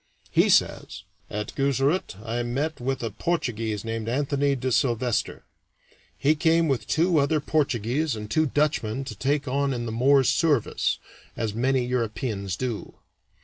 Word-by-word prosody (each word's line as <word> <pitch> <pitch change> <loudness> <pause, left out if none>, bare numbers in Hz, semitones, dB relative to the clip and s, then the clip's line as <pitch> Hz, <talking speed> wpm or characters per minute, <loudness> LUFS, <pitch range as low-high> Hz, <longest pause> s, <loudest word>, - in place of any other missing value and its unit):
He - - +4
says: - - +1 0.3
"At 105 0 -4
Guzarat 140 - 0
I 115 +2 -2
met 135 +5 -2
with 130 0 -2
a 115 - -2
Portuguese 115 - -2
named 115 0 -3
Anthony 140 +2 +1
de 130 0 -2
Sylvestre; 120 -3 0 0.7
he 145 +10 +3
came 165 +2 +3
with 130 -7 -1
two 165 0 +3
other 150 +2 +2
Portuguese 140 -1 0
and 105 -1 -6
two 155 +9 +2
Dutchmen 135 -5 0
to 135 - -6
take 140 +1 -1
on 140 +1 0
in 120 -1 -3
the 115 - -3
Moor's 130 +3 +4
service, 150 -9 +1 0.4
as 110 -2 -2
many 130 +2 +1
Europeans 110 -5 -2
do. 120 -3 -4
130 Hz, 145 wpm, -25 LUFS, 115-145 Hz, 0.7 s, He